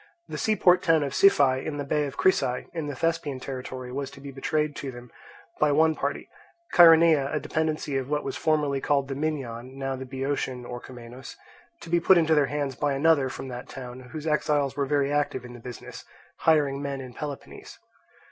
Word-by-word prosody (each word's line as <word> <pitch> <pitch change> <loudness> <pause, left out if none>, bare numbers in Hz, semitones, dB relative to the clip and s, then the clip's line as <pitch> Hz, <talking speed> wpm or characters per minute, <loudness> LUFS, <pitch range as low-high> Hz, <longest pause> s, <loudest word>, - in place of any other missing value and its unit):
The - - -6
seaport 185 -4 +4
town 160 -3 +3
of 140 -1 -3
Siphae, 140 -7 +4
in 150 -2 -4
the 145 - -3
bay 145 +1 0
of 140 - -9
Crisae, 125 -9 +1
in 165 -3 -4
the 145 - -4
Thespian 165 -4 -1
territory, 130 -1 -6
was 135 +1 -4
to - - -14
be 140 0 -8
betrayed 150 +2 -1
to 140 - -5
them 120 -1 -11 0.5
by 150 -1 +3
one 160 +2 +4
party; - - -3 0.5
Chaeronea 165 -4 +7
(a 150 - 0
dependency 155 -3 -2
of 135 0 -4
what 150 0 -1
was 135 - -4
formerly 150 -3 0
called 140 -1 +1
the - - -2
Minyan, 135 -4 -4
now 135 -1 -2
the 130 0 -7
Boeotian, 130 -1 -3
Orchomenus) 120 +1 -9 0.5
to - - -10
be 175 - +4
put 180 +2 +5
into 160 -1 +3
their 150 -3 +3
hands 145 -2 -2
by 140 +4 0
another 140 -1 +3
from 130 - -7
that 125 0 -8
town, 125 -1 -8
whose 155 -1 -6
exiles 145 -3 +1
were 140 0 -1
very 140 0 +1
active 145 -4 -1
in 120 - -10
the 120 - -10
business, 120 0 -9 0.3
hiring 145 -4 +2
men 140 -1 -3
in 130 -2 -9
Peloponnese. 145 0 -8
140 Hz, 195 wpm, -26 LUFS, 130-155 Hz, 0.5 s, Chaeronea